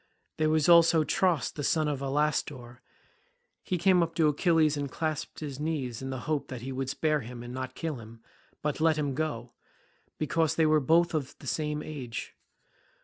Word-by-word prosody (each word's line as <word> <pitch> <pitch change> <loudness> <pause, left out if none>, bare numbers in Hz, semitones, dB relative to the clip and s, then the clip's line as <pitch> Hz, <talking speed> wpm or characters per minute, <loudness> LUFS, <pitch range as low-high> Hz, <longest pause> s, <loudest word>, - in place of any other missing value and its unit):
There 155 0 +2
was 155 -1 +2
also 170 -2 +6
Tros 175 -1 +1
the 145 - -6
son 155 +1 +2
of 145 -3 -1
Alastor—he 135 -3 -1 1.0
came 180 +1 +4
up 165 -1 -1
to 155 -2 +4
Achilles 155 0 +3
and 145 -1 -3
clasped 155 +2 -4
his 140 -3 -5
knees 140 -7 -3
in 135 - -5
the 130 -2 -4
hope 150 0 -2
that 125 -3 -7
he 135 - -4
would 130 0 -3
spare 155 +2 +1
him 120 0 -8
and 120 0 -8
not 130 0 -5
kill 160 -4 -3
him 115 0 -12 0.4
but 150 +1 -1
let 160 -1 +4
him 145 -2 -1
go, 130 -5 -3 0.6
because 160 +1 +1
they 160 - +3
were 155 0 +4
both 170 +5 +3
of 145 -3 -3
the - - -14
same 150 -1 -2
age. 130 -7 -6
150 Hz, 185 wpm, -29 LUFS, 130-160 Hz, 1.0 s, also